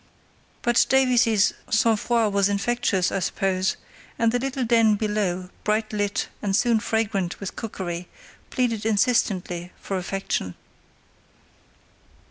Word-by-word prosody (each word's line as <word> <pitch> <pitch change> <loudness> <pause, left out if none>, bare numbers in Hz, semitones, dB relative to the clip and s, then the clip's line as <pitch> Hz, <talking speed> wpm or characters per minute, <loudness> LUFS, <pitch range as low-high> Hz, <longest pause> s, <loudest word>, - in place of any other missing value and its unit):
But 240 0 +4
Davies's 245 -6 +4 0.2
sang 220 +1 +3
froid 225 -1 +1
was 200 0 +3
infectious, 200 -2 0
I 195 - 0
suppose, 190 +1 0 0.4
and 230 -1 +2
the 245 - +1
little 265 0 -2
den 225 -2 +4
below, 200 -4 -1
bright 215 +1 0
lit 205 -1 -1
and 195 -2 0
soon 230 +1 +3
fragrant 205 -5 -1
with 200 - -6
cookery, 180 -5 -5 0.4
pleaded 235 -4 -1
insistently 200 -5 0
for 195 - -3
affection. 185 - -3
210 Hz, 115 wpm, -24 LUFS, 195-230 Hz, 0.4 s, But